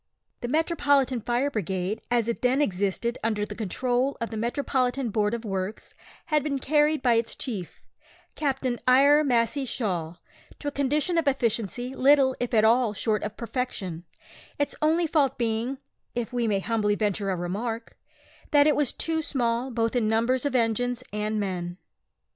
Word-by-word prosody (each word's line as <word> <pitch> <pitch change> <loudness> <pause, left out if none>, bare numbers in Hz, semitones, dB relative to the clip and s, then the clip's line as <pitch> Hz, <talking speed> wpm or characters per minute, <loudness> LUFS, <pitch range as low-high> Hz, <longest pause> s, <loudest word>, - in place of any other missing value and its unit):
The 240 - -4
"Metropolitan 285 -4 +2
Fire 245 +5 0
Brigade," 190 - -2
as 240 -2 +2
it 235 - -2
then 255 +2 +2
existed 205 0 0
under 215 -2 0
the - - -7
control 245 +5 -1
of 230 -1 -3
the - - -4
Metropolitan 250 +1 -1
Board 210 +2 +1
of 235 0 -7
Works, 195 0 -4 0.3
had 305 -3 +2
been 280 -1 -1
carried 295 +1 +2
by 245 -2 +4
its 230 0 0
chief, 205 -10 -6 0.5
Captain 265 -4 -1
Eyre 280 +4 +6
Massey 250 +1 +1
Shaw, 180 -10 -2 0.4
to 290 - -7
a - - 0
condition 295 +5 +1
of 320 - -2
efficiency 245 -1 0
little 270 0 +4
if 245 - -2
at 220 -2 +4
all 230 -1 +4
short 215 0 0
of 210 +1 -5
perfection, 225 -8 -4 0.5
its 285 - 0
only 320 +3 +3
fault 290 -4 +1
being 235 +3 -1 0.4
(if 240 0 -3
we 240 -2 0
may 200 -2 +1
humbly 210 -1 +1
venture 205 -1 -1
a 190 - 0
remark) 220 +7 -4 0.5
that 290 -2 +5
it 300 - +4
was 295 -3 +1
too 320 -1 -1
small 245 -3 -1
both 230 -1 -1
in 225 -3 +2
numbers 240 +5 +1
of 270 - -3
engines 245 +1 +1
and 210 +1 -1
men. 180 -3 -3
240 Hz, 165 wpm, -26 LUFS, 215-275 Hz, 0.5 s, Eyre